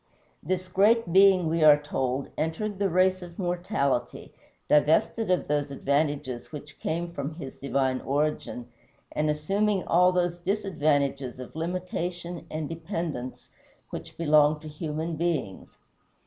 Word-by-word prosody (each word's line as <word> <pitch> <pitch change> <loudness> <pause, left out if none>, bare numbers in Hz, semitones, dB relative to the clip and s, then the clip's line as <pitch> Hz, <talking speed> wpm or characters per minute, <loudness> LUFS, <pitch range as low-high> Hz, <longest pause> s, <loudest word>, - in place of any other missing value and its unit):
This 185 +3 -2
great 200 0 +3
Being, 190 -2 +6
we 165 0 +1
are 150 -1 +8
told, 135 -2 -2
entered 190 +6 -2
the 200 -1 +2
race 185 +1 +3
of 175 -1 -10
mortality, 175 - -1 0.3
divested 160 +8 +3
of 180 - +1
those 145 -1 0
advantages 140 -3 -1
which 145 -1 -10
came 170 +2 -2
from 145 0 -4
his 140 -5 -8
divine 135 -1 0
origin, 145 -4 -1 0.4
and 150 0 0
assuming 195 +7 0
all 180 +2 +4
those 175 -1 0
disadvantages 150 - 0
of 130 - -9
limitation 175 0 -4
and 155 -1 -3
dependence 165 -6 -5 0.4
which - - -8
belong 150 -1 +4
to 155 - -9
human 155 +1 -4
beings. 155 - -3
160 Hz, 130 wpm, -27 LUFS, 145-180 Hz, 0.4 s, are